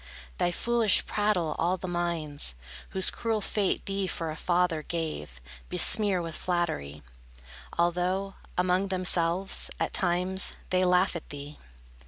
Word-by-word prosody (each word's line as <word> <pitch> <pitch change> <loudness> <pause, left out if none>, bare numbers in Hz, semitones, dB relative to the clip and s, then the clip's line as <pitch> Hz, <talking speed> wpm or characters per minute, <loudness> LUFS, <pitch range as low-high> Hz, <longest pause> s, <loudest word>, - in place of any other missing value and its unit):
Thy - - +3
foolish 230 +2 +3
prattle 205 -7 +1
all 175 +3 +2
the 185 - -6
minds, 165 - -2 0.3
Whose 190 -1 -1
cruel 225 -2 -1
fate 205 -1 0
thee 195 -1 -1
for 165 -2 -3
a - - -5
father 175 -2 +1
gave, 155 - -4 0.3
Besmear 185 0 +2
with 165 -1 -5
flattery, 155 - -2 0.7
Although, 180 +3 +1 0.2
among 180 +2 +2
themselves, 185 0 +1
at - - -1
times, 180 +1 +2 0.2
They 185 0 +3
laugh 180 0 +3
at 170 - -6
thee. 145 +1 -8
180 Hz, 130 wpm, -28 LUFS, 165-190 Hz, 0.7 s, Thy